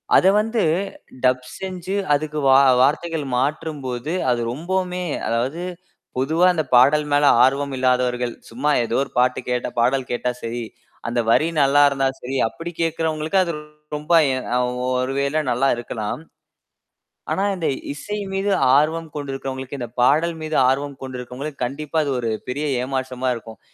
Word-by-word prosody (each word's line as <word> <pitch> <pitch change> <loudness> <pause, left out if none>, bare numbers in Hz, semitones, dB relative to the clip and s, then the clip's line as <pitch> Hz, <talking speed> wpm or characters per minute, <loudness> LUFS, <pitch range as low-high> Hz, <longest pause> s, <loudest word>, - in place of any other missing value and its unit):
அத - - +5
வந்து 225 +1 0 0.6
டப் 125 0 +2
செஞ்சு 185 0 -4 0.2
அதுக்கு 150 +1 -1
வா 135 0 +7 0.2
வார்த்தைகள் 155 +2 +1
மாற்றும்போது 140 -1 -2 0.2
அது 120 -1 +1
ரொம்போமே 180 +5 -2 0.2
அதாவது 125 +8 -1 0.6
பொதுவா 160 +7 +2
அந்தப் 155 -6 -3
பாடல் 150 +5 +5
மேல 145 0 +5
ஆர்வம் 140 +1 +1
இல்லாதவர்கள் 125 -1 +1 0.2
சும்மா 130 +6 -1
ஏதோ 115 +2 0
ஒரு - - -10
பாட்டு 125 +1 +3
கேட்டா 125 0 -1
பாடல் 125 +2 +1
கேட்டா 120 +1 -1
சரி. 115 +1 -3 0.5
அந்த 120 +1 -1
வரி 155 +7 +4
நல்லா 140 +1 +5
இருந்தா 135 -1 0 0.2
சரி, 130 +2 -4
அப்படி 165 +10 -7
கேட்கிறவங்களுக்கு, 160 +1 0
அது 170 - -2 0.4
ரொம்ப 150 +3 -5 0.2
எ - - 0 0.2
அ - - +3 0.3
ஒ - - -1 0.2
ஒருவேளை 140 +3 0
நல்லா 125 +3 +2
இருக்கலாம். 120 +1 -4 1.1
ஆனா 195 - 0
இந்த 170 -4 -2 0.3
இசை 210 +8 -5 0.2
மீது 195 +1 0 0.3
ஆர்வம் 160 +3 +1
கொண்டிருக்கிறவங்களுக்கு, 135 -1 -5
இந்தப் 120 -1 -7
பாடல் 160 +7 +3
மீது 155 0 -3
ஆர்வம் 140 +1 -1
கொண்டிருக்கிறவங்களுக்கு, 130 +2 -6
கண்டிப்பா 150 +5 -4
அது 140 - -2
ஒரு 115 -2 -1 0.2
பெரிய 140 +4 -2 0.2
ஏமாற்றமா 130 -1 -2
இருக்கும். 110 -2 -10
140 Hz, 145 wpm, -22 LUFS, 125-155 Hz, 1.1 s, வா